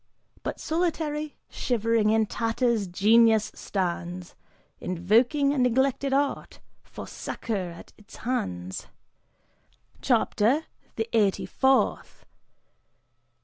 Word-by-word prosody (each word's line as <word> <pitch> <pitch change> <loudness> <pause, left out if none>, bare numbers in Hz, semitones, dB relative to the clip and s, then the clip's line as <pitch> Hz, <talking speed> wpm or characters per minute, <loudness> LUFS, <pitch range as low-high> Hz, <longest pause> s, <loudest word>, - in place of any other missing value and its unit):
But - - -4
solitary, 310 -3 -2
shivering, 230 -2 +1
in 220 0 +3
tatters 230 -1 0
Genius 220 +4 +4
stands 180 -2 -4 0.5
Invoking 235 - +2
a 285 - -1
neglected 265 +2 +2
art, 280 +1 -1 0.2
for - - -10
succor 195 -6 -4
at 170 0 -12
its 210 - -15
hands. 95 - -3 1.1
CHAPTER 255 +10 +2 0.3
THE 225 0 -2
EIGHTY 205 -4 +2
FOURTH. 265 0 +1
225 Hz, 90 wpm, -26 LUFS, 200-270 Hz, 1.1 s, Genius